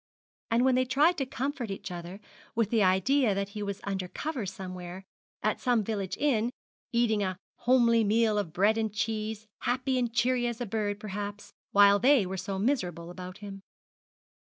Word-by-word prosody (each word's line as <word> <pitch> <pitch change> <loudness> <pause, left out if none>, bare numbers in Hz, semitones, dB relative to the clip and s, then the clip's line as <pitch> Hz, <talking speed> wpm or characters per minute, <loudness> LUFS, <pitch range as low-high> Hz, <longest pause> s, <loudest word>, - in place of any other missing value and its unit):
And 235 +2 +3
then 265 - +4
they 255 +1 +3
tried 295 +7 +3
to 270 - -1
comfort, 260 -2 -3
each 195 -1 -6
other 175 +2 -7 0.4
with 225 -2 +1
the 225 -2 +3
idea 205 +5 +3
that 200 0 -2
he 210 +1 -6
was 200 -1 -4
under 190 -2 -3
cover 260 - -4
somewhere, 185 -1 -7 0.4
at - - 0
some 245 -4 +2
village 200 -3 -3
inn, 240 -6 +2 0.4
eating 235 -3 +2
a 185 -2 -1 0.2
homely 235 -2 +4
meal 215 0 +3
of 190 -6 -3
bread 205 +6 +3
and 220 -1 -1
cheese, 215 0 -3
happy 255 +1 0
and 240 -2 0
cheery 240 +1 +2
as 235 -1 -4
a 245 - -2
bird, 205 -1 -2
perhaps, 205 0 -6 0.2
while 200 0 +6
they 255 -3 +5
were 190 +1 -4
so 190 +1 -4
miserable 180 - -1
about 185 +1 -8
him. 195 -1 -8
215 Hz, 180 wpm, -29 LUFS, 195-240 Hz, 0.4 s, while